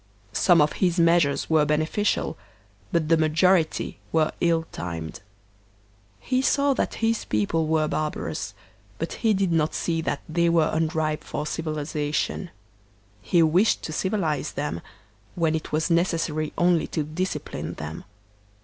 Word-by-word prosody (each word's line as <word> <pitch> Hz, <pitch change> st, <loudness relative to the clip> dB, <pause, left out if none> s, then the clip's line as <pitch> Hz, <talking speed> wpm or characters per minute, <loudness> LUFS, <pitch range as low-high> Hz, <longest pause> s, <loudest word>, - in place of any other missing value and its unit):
Some 175 Hz, -4 st, +5 dB
of 150 Hz, -, +2 dB
his 180 Hz, -2 st, +2 dB
measures 165 Hz, -4 st, +3 dB
were 160 Hz, -2 st, +4 dB
beneficial, 155 Hz, +7 st, 0 dB, 0.6 s
but 165 Hz, -2 st, +1 dB
the 165 Hz, +1 st, +4 dB
majority 160 Hz, +2 st, +2 dB
were 160 Hz, -1 st, +2 dB
ill 165 Hz, -1 st, +2 dB
timed. 80 Hz, -3 st, -6 dB, 1.0 s
He 255 Hz, 0 st, 0 dB
saw 280 Hz, +1 st, +3 dB
that -, -, -1 dB
his 225 Hz, 0 st, +1 dB
people 130 Hz, +10 st, 0 dB
were 155 Hz, -1 st, +2 dB
barbarous, 150 Hz, -, -3 dB, 0.4 s
but 165 Hz, -, -3 dB
he 220 Hz, -3 st, +3 dB
did 190 Hz, -2 st, +1 dB
not 160 Hz, -2 st, +1 dB
see 165 Hz, -1 st, -1 dB
that 145 Hz, -, -2 dB
they 170 Hz, +1 st, +2 dB
were 165 Hz, -2 st, +3 dB
unripe 160 Hz, -1 st, 0 dB
for -, -, -4 dB
civilization; 155 Hz, +2 st, -2 dB, 0.7 s
he 170 Hz, -, +3 dB
wished 175 Hz, +7 st, +3 dB
to 155 Hz, -, -4 dB
civilize 160 Hz, -6 st, -1 dB
them, 140 Hz, -, -3 dB, 0.5 s
when 165 Hz, -2 st, +1 dB
it 160 Hz, -, -3 dB
was 160 Hz, +3 st, 0 dB
necessary 165 Hz, -3 st, 0 dB
only 175 Hz, -1 st, +3 dB
to 155 Hz, -, -2 dB
discipline 170 Hz, +6 st, -4 dB
them. 75 Hz, +2 st, -7 dB
160 Hz, 140 wpm, -25 LUFS, 155-175 Hz, 1.0 s, Some